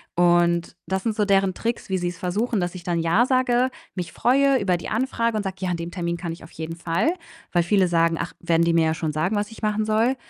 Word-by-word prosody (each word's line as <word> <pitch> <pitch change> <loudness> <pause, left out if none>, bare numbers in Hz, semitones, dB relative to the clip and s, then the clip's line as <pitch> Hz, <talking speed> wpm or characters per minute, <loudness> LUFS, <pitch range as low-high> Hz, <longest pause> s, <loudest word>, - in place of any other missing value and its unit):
Und 175 0 +3
das 190 0 -1
sind 225 -2 -1
so 210 - +1
deren 195 -2 +2
Tricks, 235 -3 -3
wie 190 - +1
sie's 175 -1 -3
versuchen, 205 +5 -1
dass 175 +1 -3
ich 180 - -8
dann 170 -1 -1
Ja 170 +9 +3
sage, 255 -1 +2 0.2
mich 180 -2 -4
freue 270 +2 +3
über 185 -3 +1
die - - -7
Anfrage 230 -1 0
und - - 0
sage: 190 -1 -4
„Ja, 185 -1 -1
an 170 - -1
dem 170 +1 -5
Termin 170 -2 -2
kann 170 -2 -4
ich 170 - -12
auf 160 - -13
jeden 160 +1 -6
Fall.“ 170 - 0 0.4
Weil 175 -1 +3
viele 190 0 +3
sagen: 165 -1 +2
„Ach, - - -4
werden 170 -1 +2
die 170 - +2
mir 165 -1 +4
ja 160 - +1
schon 155 -2 -2
sagen, 180 +7 0
was 205 +1 -1
ich 225 - -13
machen 215 0 +1
soll." 225 +4 +2
185 Hz, 255 wpm, -23 LUFS, 170-220 Hz, 0.4 s, mir